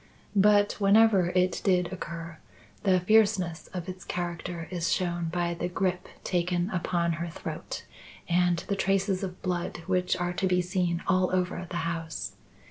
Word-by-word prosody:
But, 205 +1 +4
whenever 200 -2 +5
it 180 -1 +2
did 180 -2 +2
occur, 165 -2 -6 0.4
the 185 -2 +3
fierceness 200 -4 +3
of 180 -1 -6
its 185 0 -7
character 170 -1 -4
is 175 -2 -1
shown 175 -2 0
by 170 +1 -1
the 170 +1 -2
grip 180 0 -1 0.2
taken 180 +1 0
upon 175 -2 0
her 170 - -2
throat - - -6 0.4
and 175 0 +3
the 200 - 0
traces 195 0 +1
of 185 -2 -6
blood 175 -2 -2
which 180 -1 +1
are 175 0 -1
to 190 - 0
be 180 -1 +3
seen 180 -1 0
all 185 -1 +3
over 180 -1 -1
the 175 - -3
house. 165 -2 -4
180 Hz, 155 wpm, -28 LUFS, 175-190 Hz, 0.4 s, whenever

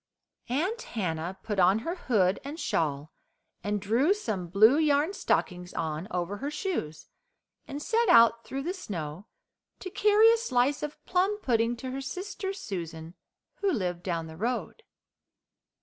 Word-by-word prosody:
Aunt 365 - -1
Hannah 180 - -3
put 210 -3 -2
on 185 +3 +5
her 335 - -1
hood 205 - +1
and 290 +4 -7
shawl, 150 - -1 0.5
and 205 0 -1
drew 240 - +2
some 210 - -3
blue 215 - +5
yarn 300 +3 +2
stockings 180 - -1
on 160 +2 -3
over 180 +3 -2
her 280 +6 -3
shoes, 300 - -3 0.6
and 280 - -5
set 460 +9 +1
out 230 0 +6
through 270 +1 -5
the 350 +4 -2
snow 180 - -6 0.5
to 370 - -7
carry 425 +3 +5
a - - +2
slice 275 - +1
of 300 0 -5
plum 380 +3 +1
pudding 235 - +1
to 260 +2 -5
her 270 +1 -4
sister 385 +7 -4
Susan, 170 - -6 0.4
who 400 -1 +1
lived 180 - -2
down 170 -3 -2
the 160 0 -10
road. 245 - -3
230 Hz, 150 wpm, -28 LUFS, -, 0.6 s, out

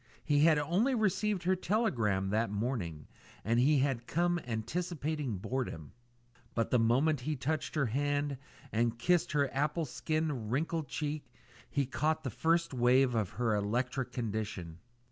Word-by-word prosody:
He 145 -1 +2
had 155 0 +6
only 185 - +2
received 210 -3 +1
her 185 +2 +3
telegram 120 - 0
that 110 +1 +1
morning, 100 - -3 0.4
and 115 +3 +2
he 145 +4 +4
had 130 -3 0
come 175 +2 +1
anticipating 145 - -2
boredom; 100 - -4 0.6
but 115 - 0
the 125 - +4
moment 130 +7 +3
he 150 +4 -2
touched 150 +4 -2
her 145 -3 +2
hand 145 +3 -1 0.3
and 115 +1 +1
kissed 170 +7 +2
her 140 -3 +1
apple 150 +4 0
skin 150 -4 -2
wrinkled 155 +4 -1
cheek, 145 -1 -4 0.4
he 140 -1 0
caught 155 +4 0
the 130 - -3
first 165 +6 +1
wave 125 +1 +4
of 110 -5 0
her 115 -2 +1
electrical 125 +5 -1
condition. 105 -8 -4
135 Hz, 145 wpm, -32 LUFS, 115-155 Hz, 0.6 s, had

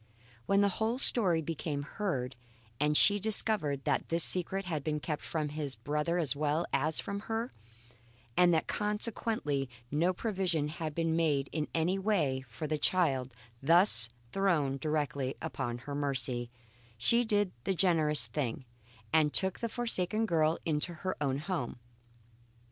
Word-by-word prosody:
When 195 0 +4
the 200 - +4
whole 225 +2 0
story 185 -11 +3
became 150 -2 -3
heard, 140 -8 -3 0.4
and 150 +1 +3
she 205 0 +6
discovered 195 -9 0
that - - -1
this 165 0 +2
secret 190 +2 +2
had 160 -6 -3
been 150 0 -1
kept 150 0 -4
from 155 -2 -2
his 145 -2 -4
brother 150 +8 -1
as 155 -5 +1
well 150 +3 0
as 155 +3 +1
from 200 0 -4
herself, 225 +3 -3 0.8
and 180 -1 +5
that 160 -2 +2
consequently 210 - -2 0.2
no 165 +5 +2
provision 185 -6 -1
had 155 -1 -5
been 165 -1 0
made 150 -5 +1
in 155 -2 -2
any 175 +4 +1
way 165 -11 +1
for 115 +7 -6
the 155 0 -2
child 135 -8 +1 0.3
thus 160 - +7 0.2
thrown 160 -9 +1
directly 145 -2 -2
upon 135 -7 -4
her 140 +4 -8
mercy, 130 -4 -2 0.5
she 235 - +3
did 205 -4 +1
the 190 - -1
generous 160 -5 +3
thing 130 -3 -3 0.5
and 155 -2 +4
took 190 -1 0
the 230 - -2
forsaken 220 -3 0
girl 160 -4 +2
into 160 +2 -1
her 185 +4 -3
own 135 -2 0
home. 160 -6 -4
160 Hz, 150 wpm, -31 LUFS, 145-190 Hz, 0.8 s, thus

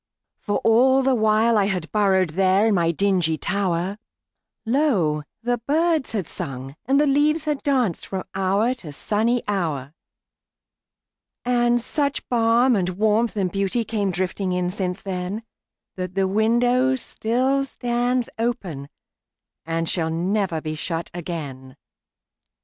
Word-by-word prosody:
For 205 - -1
all 260 +4 +4
the 265 0 +3
while 220 0 +3
I 200 - +3
had 180 -5 -2
burrowedThere 190 0 +3
in - - +2
my 170 -3 +2
dingy 175 -2 +1
tower, 195 0 -1 0.7
Lo! 220 - +1 0.2
the 245 0 0
birds 315 -3 +1
had 200 -6 -1
sung 135 -1 -4
and 275 +2 +4
the 300 - +4
leaves 295 +3 +2
had 300 -2 -1
dancedFrom 230 - -1
hour 195 +5 +1
to 195 -12 -10
sunny 225 +9 0
hour. 155 -9 -2 1.5
And 240 -1 +2
such 280 +3 -1
balm 235 +1 +3
and 185 -3 0
warmth 220 +2 +1
and 185 -3 -1
beautyCame 200 0 -1
drifting 185 +1 -2
in 180 0 -1
since 185 -1 -3
then, 190 +3 -4 0.5
That 185 0 -5
the 195 -1 +2
window 245 +5 +2
still 260 +3 0
stands 245 -1 -1
openAnd 185 - -3 1.0
shall 165 -1 0
never 175 0 -1
be 155 0 -4
shut 165 +2 -4
again. 145 -7 -6
205 Hz, 125 wpm, -23 LUFS, 180-245 Hz, 1.5 s, all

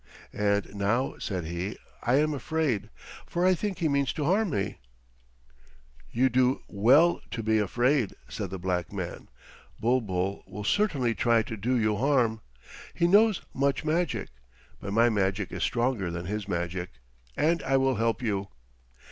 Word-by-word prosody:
"And 100 -1 0
now," 105 +6 0
said 90 -5 -3
he, 85 +5 -4 0.2
"I 120 +2 +2
am 150 +2 +2
afraid, 145 -4 -1 0.4
for 175 +1 0
I 185 - +5
think 195 +1 -3
he 170 -4 +1
means 140 -2 +1
harm 185 +8 +1
to 140 - -1
me." 100 - -3 1.3
"You 125 +3 +3
do 130 +1 +2
well 135 +12 +4
to 115 - -4
be 110 0 +2
afraid," 120 +3 +1
said - - -5
the 95 - -5
black 90 -1 -2
man. 90 -4 -6 0.5
"Bulbul 100 -6 0
will 100 +2 -7
certainly 140 - +1
try 115 -1 +2
to 110 - -6
do 115 +5 -1
you 110 -2 +1
harm. 120 -4 +2 0.5
He 170 - +2
knows 205 +3 +4
much 140 +2 0
magic, 165 0 0 0.5
but 100 - -6
my 115 +3 +4
magic 100 -2 0
is - - -5
stronger 120 -6 0
than 85 +1 -5
his 105 +1 -4
magic, 90 -1 -3 0.4
and 165 +1 +2
I 135 0 +2
will 135 -2 +2
help 115 +3 0
you. 100 -3 -1
115 Hz, 155 wpm, -28 LUFS, 100-140 Hz, 1.3 s, I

